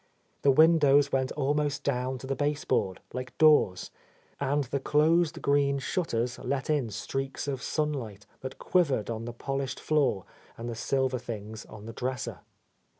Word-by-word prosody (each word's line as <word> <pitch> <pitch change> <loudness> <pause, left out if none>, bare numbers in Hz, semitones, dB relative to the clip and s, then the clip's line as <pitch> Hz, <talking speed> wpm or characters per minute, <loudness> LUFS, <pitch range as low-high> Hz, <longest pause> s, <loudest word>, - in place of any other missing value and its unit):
The 140 - +4
windows 145 -1 +5
went 130 -1 +1
almost 145 0 0
down 130 -1 -1
to 130 - -9
the 135 +1 -2
baseboard, 145 -9 0
like 125 +1 -6
doors, 150 -12 +4 0.5
and 145 +1 +1
the 140 +2 -2
closed 155 +4 +2
green 140 0 +3
shutters 125 -5 -1
let 140 +2 -2
in 140 -6 +1
streaks 135 +7 -4
of 135 -3 -2
sunlight 130 -12 -2
that 130 0 -7
quivered 140 - +1
on 115 0 -4
the 120 - -4
polished 135 +2 -3
floor 140 -11 +1 0.3
and 115 - -6
the 120 - -3
silver 130 +2 0
things 110 -2 -7
on 105 -1 -11
the 115 - -7
dresser. 130 +2 -3
135 Hz, 150 wpm, -28 LUFS, 120-145 Hz, 0.5 s, windows